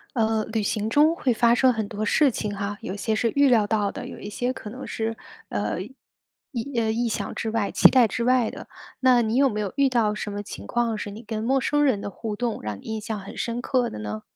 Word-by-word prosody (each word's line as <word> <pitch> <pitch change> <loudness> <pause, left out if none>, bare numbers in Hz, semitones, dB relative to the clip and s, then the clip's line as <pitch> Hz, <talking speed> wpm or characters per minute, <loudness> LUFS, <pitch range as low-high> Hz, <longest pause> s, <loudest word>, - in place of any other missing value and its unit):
呃， 220 -1 +1
旅 220 -1 -1
行 210 +1 -1
中 300 +7 +4
会 260 -7 0
发 235 +1 +4
生 255 +1 +4
很 220 -3 -2
多 210 +1 -4
事 280 +6 +4
情 210 -3 -3
哈， 200 +1 -3
有 190 - -5
些 220 +2 -1
是 230 +1 +1
预 280 0 +5
料 225 -5 +4
到 205 -2 0
的， - - -7
有 - - -9
一 205 - -7
些 245 +4 -1
可 215 - -8
能 255 +4 -8
是， 225 0 -3 0.3
呃， 105 +9 -2
意 260 - -10
呃， 220 -1 +1
意 235 +2 0
想 220 - -3
之 225 - -3
外， 220 -2 0
期 - - +7
待 250 -4 +5
之 230 +3 -2
外 250 -2 +3
的。 - - -10 0.3
那 255 -2 +5
你 220 +1 0
有 275 +1 +5
没 210 - -3
有 205 -2 -3
遇 280 -1 +4
到 230 -4 +2
什 210 -1 -4
么 205 0 -4
情 205 - -9
况 235 -2 0
是 210 -1 -5
你 210 +3 -9
跟 220 -1 -4
陌 265 +3 +2
生 295 +3 +2
人 255 -8 +2
的 200 - -5
互 215 +2 -5
动 230 +1 -2
让 105 -2 -4
你 - - -22
印 220 0 -4
象 215 0 -4
很 195 - -10
深 235 0 -2
刻 250 -1 0
的 - - -7
呢？ 105 0 -5
225 Hz, 275 characters per minute, -25 LUFS, 210-245 Hz, 0.3 s, 期